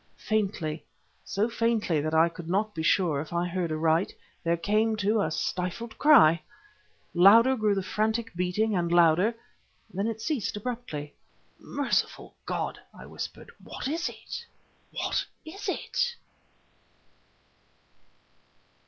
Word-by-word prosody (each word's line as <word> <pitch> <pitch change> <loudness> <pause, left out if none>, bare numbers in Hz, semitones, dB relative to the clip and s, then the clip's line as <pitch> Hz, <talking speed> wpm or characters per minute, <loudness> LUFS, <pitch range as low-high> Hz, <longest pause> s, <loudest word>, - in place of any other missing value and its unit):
Faintly, 190 -8 -1 0.4
so 205 +3 0
faintly, 230 -9 +1
that 155 +1 -1
I 160 +1 +6
could 170 0 -8
not 210 +4 0
be 160 - -4
sure 160 -3 +2
if 155 - -9
I 175 +1 0
heard 175 -2 -2
aright, 160 +3 +1 0.3
there 170 0 +1
came, 215 +6 +1
too, 210 +1 +1
a 160 - 0
stifled 180 +7 -3
cry. 170 - +6 0.7
Louder 225 +9 +7
grew 215 -4 +1
the 195 - 0
the - - -10
frantic 220 +3 -1
beating 180 +5 0
and 170 -2 0
louder... 175 +6 +4 0.6
then 195 +4 -1
it 225 -1 -3
ceased 245 - -2
abruptly. 210 -11 -5 0.5
"Merciful 285 -1 -2
God!" - - -3
I - - -12
whispered - - -7
"what - - -6
was 325 +4 -1
it? - - -8 0.4
What - - -1 0.2
was 360 +6 -6
it?" 485 -1 -1
195 Hz, 130 wpm, -28 LUFS, 170-225 Hz, 0.7 s, Louder